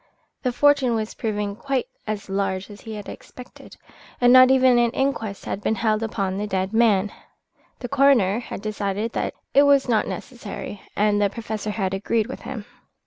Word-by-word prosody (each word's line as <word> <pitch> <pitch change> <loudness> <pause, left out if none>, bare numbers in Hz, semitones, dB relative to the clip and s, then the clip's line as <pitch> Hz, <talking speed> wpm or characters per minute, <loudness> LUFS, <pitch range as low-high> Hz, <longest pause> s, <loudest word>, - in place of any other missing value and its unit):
The 250 - 0
fortune 275 -2 +3
was 220 -1 -3
proving 205 -2 -3
quite 265 +2 -2 0.2
as 210 -2 -4
large 195 0 -2
as 205 - -12
he 220 -1 -7
had 205 -1 -8
expected, 250 - -12 0.4
and 245 0 +5
not 255 0 +8
even 260 -2 +5
an 240 0 +3
inquest 225 -7 -2
had 200 - -4
been 220 - 0
held 215 +1 0
upon 195 -4 -2
the 210 - -2
dead 190 0 -2
man. 210 -3 +3 0.7
The 245 - -4
coroner 255 -7 +3
had 225 -4 -8
decided 210 +1 -2
that - - -3 0.2
it 280 - +7
was 280 -2 +4
not 225 -3 +2
necessary, 215 -3 -7
and 205 0 +2
the 200 - +3
Professor 220 -1 -5
had 195 -3 -2
agreed 215 +3 0
with 260 - -8
him. 235 -3 -7
220 Hz, 180 wpm, -23 LUFS, 205-245 Hz, 0.7 s, not